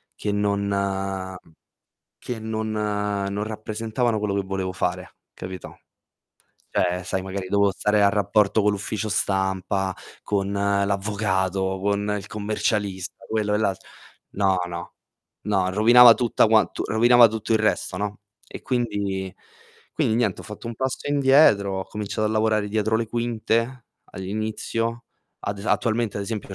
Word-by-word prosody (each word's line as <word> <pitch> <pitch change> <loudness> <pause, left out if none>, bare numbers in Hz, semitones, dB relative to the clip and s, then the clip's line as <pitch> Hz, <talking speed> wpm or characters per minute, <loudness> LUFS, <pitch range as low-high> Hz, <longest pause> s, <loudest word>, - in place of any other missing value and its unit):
che 105 - -3
non 100 0 0
mhmm, 95 -1 -2 0.8
che 120 - -5
non 110 0 -3
non 105 -1 -1
rappresentavano 110 +2 -2
quello 105 -1 -1
che 100 - 0
volevo 95 -1 -3
fare, - - -3 0.2
capito, 95 0 -8 0.9
cioè, 90 0 0
sai, 95 0 -2
magari 95 0 -5
dovevo 100 0 +3
stare 105 +2 +1
a 100 - +6
rapporto 105 +1 +2
con 105 - +4
l'ufficio 105 +2 -3
stampa, 95 -1 0 0.3
con 100 -1 -1
l'avvocato, 100 -1 0
con 100 +1 0
il 100 0 -6
commercialista, 105 -2 -2
quello 105 -2 0
e - - +2
l'alt 100 -4 -1 0.5
no, 95 -2 +2
no, 85 0 -7 0.5
no, 95 -3 +1
rovinava 120 +3 +8
tutta 120 -1 +2
quant 110 0 +3
rovinava 120 +2 +6
tutto 110 +1 -3
il - - +4
resto, 105 -3 0
no, 105 +2 -4 0.3
e - - -9
quindi 100 -6 -2 0.6
quindi 110 - +1
niente, 115 -6 0
ho - - -15
fatto 105 +2 -9
un 115 - -5
passo 130 +3 -3
indietro, 135 -9 +4
ho - - -5
cominciato 105 0 -3
a - - -2
lavorare 110 -1 +1
dietro 110 +1 +1
le 115 0 -1
quinte 115 +1 -1 0.3
all'inizio. 110 +4 -3 0.4
Ad 100 0 -3
es 100 - -8
attualmente, 115 -2 0
ad - - -2
esempio, 100 -2 -5
105 Hz, 140 wpm, -24 LUFS, 95-110 Hz, 0.9 s, rovinava